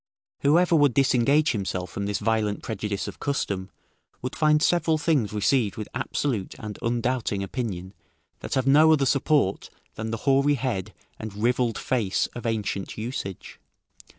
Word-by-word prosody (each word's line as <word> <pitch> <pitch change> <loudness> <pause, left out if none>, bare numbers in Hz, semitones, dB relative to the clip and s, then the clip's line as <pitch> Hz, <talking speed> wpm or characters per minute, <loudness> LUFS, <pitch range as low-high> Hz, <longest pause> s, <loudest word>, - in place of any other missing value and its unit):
Whoever 170 +4 +4
would 145 -6 +4
disengage 140 +3 +3
himself 95 -4 -3
from 100 +2 -3
this 100 -1 -1
violent 110 -1 0
prejudice 105 -2 -3
of - - -8
custom, 100 -9 -2 0.5
would 125 - -4
find 155 -1 +4
several 165 -2 +2
things 145 - +1
received 105 +1 +1
with 105 - -5
absolute 115 -10 -2
and 105 -5 -7
undoubting 120 -3 -1
opinion, 95 -3 -4 0.5
that - - -4
have 130 -1 +1
no 150 +4 +6
other 140 -3 +2
support 140 -6 +1 0.2
than 110 +1 -5
the 115 - -2
hoary 140 +1 +4
head 120 -8 -3 0.2
and 110 -2 -7
rivelled 120 +2 +1
face 115 -7 0
of 120 -1 -5
ancient 105 -3 -3
usage. 110 -5 -6
120 Hz, 150 wpm, -25 LUFS, 105-140 Hz, 0.5 s, no